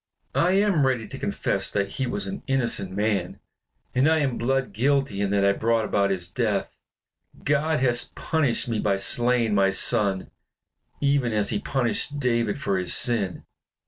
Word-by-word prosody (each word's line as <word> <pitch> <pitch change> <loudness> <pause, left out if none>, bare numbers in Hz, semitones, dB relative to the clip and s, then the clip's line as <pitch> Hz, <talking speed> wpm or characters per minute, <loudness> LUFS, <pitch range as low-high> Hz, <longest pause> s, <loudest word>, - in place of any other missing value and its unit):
I 180 +2 +2
am 190 -8 +2
ready 120 -4 -1
to - - -9
confess - - -1
that 100 -1 -1
he 130 +5 -3
was 200 +12 -2
an 195 0 -6
innocent 125 -8 0
man; 100 -2 -2 0.5
and 130 +5 +3
I 160 - +3
am 135 -4 -1
blood 130 -1 -1
guilty 135 -2 0
in 100 - 0
that 100 0 +1
I 100 - +5
brought 115 +2 0
about 100 -1 +1
his 90 -3 -2
death. 85 - -2 0.7
God 150 +2 +1
hath 120 -2 +1
punished 145 -6 -1
me 115 -3 -2
by 100 -2 +1
slaying 120 +2 +2
my 100 -1 +3
son, 95 0 +2 0.7
even 140 -4 +1
as 105 -1 0
he 105 - -1
punished 135 +4 -1
David 120 -2 0
for 100 -7 -1
his 90 - +2
sin. 105 -7 +1
115 Hz, 170 wpm, -24 LUFS, 100-135 Hz, 0.7 s, I